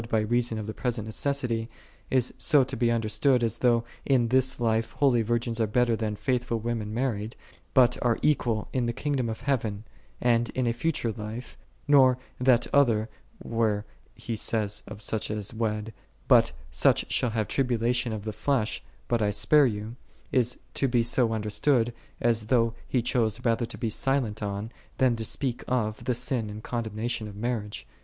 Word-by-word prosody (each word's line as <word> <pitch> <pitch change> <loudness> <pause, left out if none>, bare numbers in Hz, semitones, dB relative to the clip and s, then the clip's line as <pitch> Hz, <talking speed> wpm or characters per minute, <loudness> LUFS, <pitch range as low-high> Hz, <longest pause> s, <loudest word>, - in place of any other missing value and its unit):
by 110 -2 +2
reason 120 +1 +1
of 110 - -4
the 110 - -5
present 120 -4 -2
necessity," 120 -2 -1 0.2
' - - -29
is 130 -2 +1
so 135 +2 +4
to 130 +1 -5
j - - -8
be 120 -2 +3
understood, 120 +3 +2
as 115 -3 0
though 120 -2 +3 0.2
in 125 -4 +2
this 130 +1 +2
life 115 -1 0
holy 130 -5 +3
virgins 115 +1 -1
are 110 - +2
better 120 +2 +2
than 110 -2 -2
faithful 125 0 -1
women 110 -2 -3
mar 125 +4 0
ried, 105 +2 -6 0.4
but 125 -2 +5
are 120 -2 +2
equal 120 -7 +1
in 125 -2 0
the 120 - -1
kingdom 135 -3 -1
of 110 - -5
heaven, 110 -7 -1 0.4
and 120 -1 +2
in 130 - +1
a 115 - +1
future 120 -2 -1
life: 110 +2 -7 0.3
nor 130 -3 +6 0.2
that 125 -1 +4
other, 115 -6 +3 0.3
where 110 -2 0 0.3
he 115 - -5
saith 105 -1 -2
of 105 0 -8
such 110 0 -1
as 105 -1 -2
wed, 110 -1 -2 0.2
" - - -34
But - - +5 0.2
such 65 - +2
shall 125 - +2
have 110 -2 -1
tribulation 125 -1 0
of 110 -2 -4
the 110 0 -4
flesh, 130 -5 -1 0.2
but 120 -2 +1
I 105 - +2
spare 145 +7 +4
you;"2 110 +1 -4 0.4
is 125 -1 +1
to 135 - +1
be 120 -2 +2
so 120 0 +2
understood, 115 +3 +1 0.3
as 115 -2 +1
though 115 -2 +3
he 125 -3 0
chose 120 -1 0
rather 115 0 +1
to - - -9
be 115 -3 -2
silent 125 -4 0
on, 100 +2 -3 0.3
than 130 -2 +3
to 115 - -3
speak 125 +2 -2
of, 110 -4 -1
the 125 - +1
j - - -2
sin 125 -3 -1
and 105 +1 -8
condemnation 115 -1 -3
of 105 - -9
marriage. 105 -1 -3
115 Hz, 190 wpm, -27 LUFS, 110-125 Hz, 0.4 s, nor